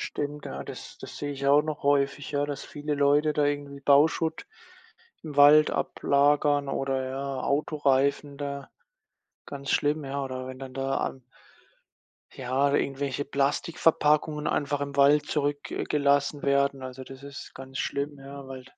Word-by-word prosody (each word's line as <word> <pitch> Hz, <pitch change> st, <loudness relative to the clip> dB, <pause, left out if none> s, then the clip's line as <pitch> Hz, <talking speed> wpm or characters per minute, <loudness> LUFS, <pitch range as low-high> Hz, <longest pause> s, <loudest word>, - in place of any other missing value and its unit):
Stimmt, 145 Hz, 0 st, -4 dB
ja, 70 Hz, +1 st, -6 dB
das -, -, -10 dB
das -, -, -9 dB
sehe 145 Hz, 0 st, -4 dB
ich 140 Hz, 0 st, -3 dB
auch 145 Hz, +2 st, +5 dB
noch 155 Hz, -1 st, -4 dB
häufig, 140 Hz, 0 st, +1 dB
ja, 145 Hz, -1 st, 0 dB
dass 145 Hz, -2 st, -5 dB
viele 150 Hz, 0 st, -4 dB
Leute 145 Hz, +1 st, +3 dB
da 145 Hz, -1 st, +2 dB
irgendwie 145 Hz, -1 st, -3 dB
Bauschutt 155 Hz, -, +3 dB, 0.8 s
im 150 Hz, -3 st, -7 dB
Wald 150 Hz, +1 st, +7 dB
ablagern 145 Hz, 0 st, +2 dB
oder 135 Hz, -1 st, -1 dB
ja 135 Hz, 0 st, -4 dB
Autoreifen 140 Hz, -1 st, +1 dB
da 140 Hz, -1 st, -5 dB, 0.8 s
ganz 140 Hz, -1 st, -5 dB
schlimm, 145 Hz, 0 st, +1 dB
ja. 140 Hz, +1 st, -3 dB
Oder 130 Hz, -1 st, -5 dB
wenn 130 Hz, 0 st, -8 dB
dann 130 Hz, -1 st, -9 dB
da 135 Hz, 0 st, -1 dB
an 135 Hz, -, -3 dB, 1.1 s
ja, 140 Hz, +2 st, 0 dB
irgendwelche 140 Hz, 0 st, -1 dB
Plastikverpackungen 150 Hz, +1 st, +1 dB
einfach 145 Hz, -1 st, 0 dB
im 140 Hz, 0 st, -4 dB
Wald 145 Hz, +1 st, +5 dB
zurück 145 Hz, -1 st, -1 dB
äh, -, -, -2 dB
gelassen 145 Hz, 0 st, +1 dB
werden. 140 Hz, -1 st, +1 dB
Also, 130 Hz, 0 st, -7 dB
das 135 Hz, 0 st, -12 dB
ist 140 Hz, 0 st, -10 dB
ganz 130 Hz, 0 st, -9 dB
schlimm, 140 Hz, +1 st, -3 dB
ja, 140 Hz, 0 st, -10 dB
weil 130 Hz, -1 st, -8 dB
140 Hz, 155 wpm, -27 LUFS, 135-145 Hz, 1.1 s, Wald